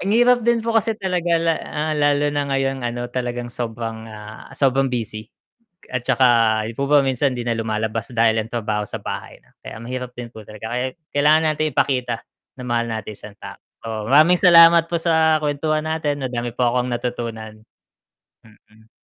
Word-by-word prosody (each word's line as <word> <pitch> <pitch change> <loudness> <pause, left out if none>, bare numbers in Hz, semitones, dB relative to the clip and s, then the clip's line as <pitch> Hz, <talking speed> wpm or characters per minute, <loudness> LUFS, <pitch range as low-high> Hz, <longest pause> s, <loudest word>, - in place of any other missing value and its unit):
Ang 195 - -2
hirap 245 +2 +4
din 235 0 +1
po 230 - 0
kasi 225 0 +1
talaga 180 -4 0
la 165 0 +1
ah, 155 +1 -3
lalo 145 0 +2
na 145 -1 -1
ngayong, 135 -1 -1
ano, 120 0 -3
talagang 120 -1 -4
sobrang, 115 -1 -5
ah, 110 0 -11
sobrang 135 0 +2
busy. 110 -3 -4 0.6
At 130 - -2
saka 115 -4 +3
'di 115 - -5
po 140 - 0
ba 145 -1 +6
minsan, 135 +1 +1
'di 120 - -4
na 120 - 0
lumalabas 110 -1 -2
dahil 115 -2 +2
ang 110 - -9
trabaho 105 -3 -2
sa - - -4
bahay. - - -6 0.2
Kaya - - -9
mahirap 125 +1 -6
din 120 -1 -8
po 110 - -10
talaga. 110 +2 -8
Kaya 125 +1 -1 0.3
kailangan 155 +2 +3
nating 155 -1 -2
ipakita 125 -4 0 0.3
na 125 - -8
mahal 120 -1 -1
natin 110 -1 -5
isang 105 0 -10
tao. - - -10 0.3
So 110 -1 -4
maraming 155 +6 +6
salamat 170 -2 +7
po 170 - 0
sa 160 -1 +3
kwentuhan 155 +1 -1
natin. 155 -2 -1
Madami 120 -1 -3
po 125 - +2
akong 125 0 0
natutunan. 115 -3 -5 0.8
Mm. 110 0 -23
125 Hz, 180 wpm, -21 LUFS, 115-155 Hz, 0.8 s, salamat